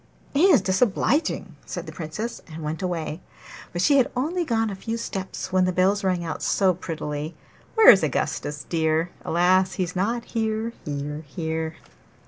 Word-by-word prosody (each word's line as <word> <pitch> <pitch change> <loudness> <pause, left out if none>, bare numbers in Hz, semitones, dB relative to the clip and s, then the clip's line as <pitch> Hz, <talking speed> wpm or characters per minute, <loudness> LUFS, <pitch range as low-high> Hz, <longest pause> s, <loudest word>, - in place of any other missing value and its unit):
'He 295 +6 +4
is 335 - +6
disobliging!' 220 - +1
said - - -6
the - - -7
Princess, 180 +9 -5
and 160 0 -7
went 155 +3 -3
away. 170 -3 -3 0.5
But 175 +1 -1
she 285 +5 +5
had 260 - +4
only 325 +8 0
gone 225 -7 0
a - - -4
few 225 +4 -4
steps 190 -4 -5
when 185 -1 +4
the 185 - +1
bells 190 +3 +2
rang 180 -2 0
out 160 - -4
so 190 -2 +3
prettily 155 -2 -5 0.4
'Where 445 -1 +10
is - - +5
Augustus 150 0 -2
dear? 160 +1 +1
Alas! 185 +2 +3
he's 180 -1 -2
not 230 +6 0
here, 220 0 -2
here, 150 +1 -4
here. 160 +1 -3
185 Hz, 165 wpm, -24 LUFS, 160-225 Hz, 0.5 s, Where